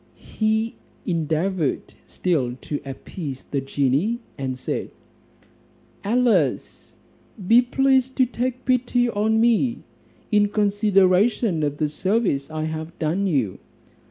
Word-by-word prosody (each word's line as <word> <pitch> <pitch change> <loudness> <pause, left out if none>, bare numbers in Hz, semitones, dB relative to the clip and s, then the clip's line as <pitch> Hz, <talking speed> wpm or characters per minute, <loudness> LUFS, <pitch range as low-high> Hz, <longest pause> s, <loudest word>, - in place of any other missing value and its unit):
He 220 +1 +1 0.3
endeavoured 165 -1 -1
still 135 -9 -1
to 145 - -4
appease 135 +1 -7
the 140 - -3
genie, 140 - 0 0.2
and 130 -2 -4
said, - - -4 1.1
"Alas! 210 - 0 0.5
be 230 +4 +7
pleased 265 +1 +2
to 260 - +4
take 255 +1 -3
pity 245 -1 +2
on 220 +1 +1
me, 235 +1 +2 0.5
in 210 -1 +4
consideration 200 -1 +2
of 145 -1 -1
the 155 - +1
service 180 -3 0
I 155 0 -3
have 160 +2 -5
done 175 +6 0
you." 130 - 0
195 Hz, 110 wpm, -23 LUFS, 150-230 Hz, 1.1 s, be